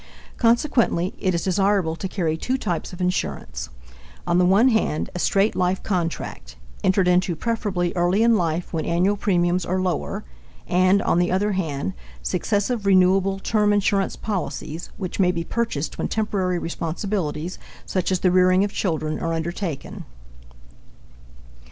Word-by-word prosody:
Consequently, 230 - +2
it 185 -2 +1
is 170 - -1
desirable 195 -3 +1
to 190 - -4
carry 170 -5 -1
two 255 +11 -1
types 175 -9 -3
of 180 0 -8
insurance: 60 - -2 0.6
on 175 0 +2
the 180 - +4
one 200 +8 +5
hand, 220 -9 0
a 180 - -4
straight 195 +4 +2
life 185 +1 0
contract, 165 - -3 0.3
entered 190 -1 +3
into 180 -1 +2
preferably 195 -3 -1
early 180 +5 +2
in 230 0 +5
life 170 -2 -1
when 160 - -1
annual 180 +4 +2
premiums 180 -3 +1
are 185 +2 -1
lower, 180 -4 -2 0.4
and, 185 +2 +3
on 170 - +2
the 175 - +1
other 205 +3 +1
hand, 145 - -2 0.3
successive 205 - -1
renewable 190 0 +4
term 210 +1 +1
insurance 200 -1 +1
policies 175 -5 -4
which 190 -2 -5
may 180 -2 +4
be 170 -1 -3
purchased 195 -7 -3
when - - 0
temporary 195 -4 -1
responsibilities, 170 -1 -3 0.3
such 185 0 -1
as 185 - 0
the 185 - +3
rearing 185 +1 +4
of 205 0 -2
children, 155 -4 -1
are 165 0 -1
undertaken. 165 -1 -4
185 Hz, 150 wpm, -23 LUFS, 170-200 Hz, 0.6 s, one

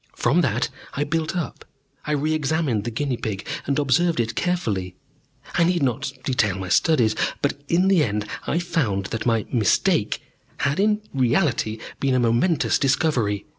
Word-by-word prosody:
"From - - +2
that - - 0 0.3
I 145 - 0
built 160 +3 -2
up. 170 - -4 0.4
I 150 - +1
re 150 +2 0
examined 150 -7 0
the - - -1
guinea 125 +2 -2
pig, 105 -3 -4 0.2
and 140 - +1
observed 150 +3 +2
it 115 -1 0
carefully. 105 - -1 0.6
I 175 - +3
need 175 -2 +2
not 130 +1 -1
detail 105 -8 +1
my 95 -1 -5
studies. 120 - +3 0.3
But 145 0 -1
in 180 +5 +3
the 190 -5 +4
end 105 -3 -1 0.2
I 155 - +1
found 155 - 0
that 115 - -2
my 115 -2 +2
'mistake' 110 -7 +2 0.4
had 140 +3 +1
in 210 +1 +2
reality 125 - +1 0.2
been 135 -2 +1
a - - +3
momentous 120 +8 +2
discovery. 130 -8 +1
135 Hz, 165 wpm, -23 LUFS, 115-160 Hz, 0.6 s, the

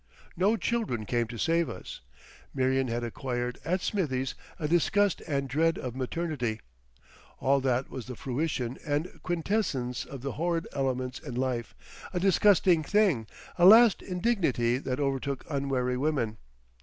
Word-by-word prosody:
No 200 +6 +2
children 215 - -1
came 120 +1 0
to 115 +1 -7
save 165 +6 +1
us. - - -8 0.5
Marion 130 0 +2
had 120 0 -2
acquired 125 0 -3
at 180 +3 0
Smithie's 135 -12 -1 0.2
a 150 - -2
disgust 185 +4 +2
and 140 -3 -1
dread 160 +5 +1
of 125 -2 -5
maternity. 130 -4 -2 0.8
All 140 +1 +3
that 130 0 0
was 125 -3 -6
the 125 - -6
fruition 130 -1 -2
and 150 +3 -2
quintessence 165 - -1
of 135 -3 -9
the 140 - -2
"horrid" 165 +1 -1
elements 130 -2 -2
in 135 -5 -7
life, 125 -2 -2 0.4
a - - +2
disgusting 190 -2 +4
thing, 165 - +2 0.3
a 175 - +6
last 225 +1 +8
indignity 175 - +1
that 130 -1 -3
overtook 135 -1 -2
unwary 135 -3 -1
women. 130 -6 -1
140 Hz, 145 wpm, -29 LUFS, 125-170 Hz, 0.8 s, last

